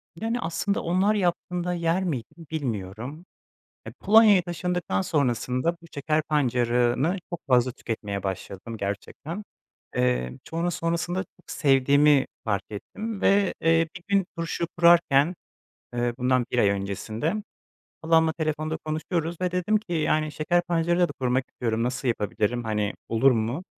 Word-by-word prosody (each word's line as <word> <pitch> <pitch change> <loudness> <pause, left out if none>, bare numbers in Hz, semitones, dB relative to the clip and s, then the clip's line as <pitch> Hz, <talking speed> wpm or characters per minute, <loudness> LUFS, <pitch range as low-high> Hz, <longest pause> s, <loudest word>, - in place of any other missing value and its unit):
Yani, 225 +6 -2
aslında 170 +5 -1
onlar 190 +5 +2
yaptığında 180 -1 -1
yer 170 +2 0
miydim, 160 +1 -5
bilmiyorum. 125 - -4 0.6
Eee, - - -7
Polonya'ya 210 -3 +6
taşındıktan 175 - -2
sonrasında 130 - 0
bu - - -14
şeker 155 +2 +1
pancarını 125 +2 +1
çok 175 -1 -4
fazla 125 -1 +4
tüketmeye 105 -4 -5
başladım, 100 +4 -5
gerçekten. 145 - -5 0.5
Eee, 60 0 0
sonra 170 +2 -1
sonrasında 170 +3 -1 0.2
sevdiğimi 140 0 +4 0.2
fark 100 -3 0
ettim 205 - -6
ve, 200 -1 +3
eee, 165 0 +3
bir 175 - -9
gün 200 -2 +2
turşu 165 0 -2
kurarken, 170 -2 +5 0.6
eee, 120 0 0
bundan 125 -1 +2
1 125 - -1
ay 100 - +5
öncesinde 105 - -2 0.7
halamla 160 0 +4
telefonda 155 0 -2
konuşuyoruz 160 +2 -3
ve 180 -1 0
dedim 180 +4 +1
ki, 210 -4 -4
"Yani, 155 -1 +1
şeker 175 +4 +1
pancarıyla 175 +1 +1
da - - -6
kurmak 130 +1 +1
istiyorum. 115 -1 -2
Nasıl 125 +1 -1
yapabilirim, 115 +1 -1
hani, 105 -1 -1
olur 130 +4 +4
mu?" 120 +10 -1
155 Hz, 135 wpm, -26 LUFS, 120-175 Hz, 0.7 s, Polonya'ya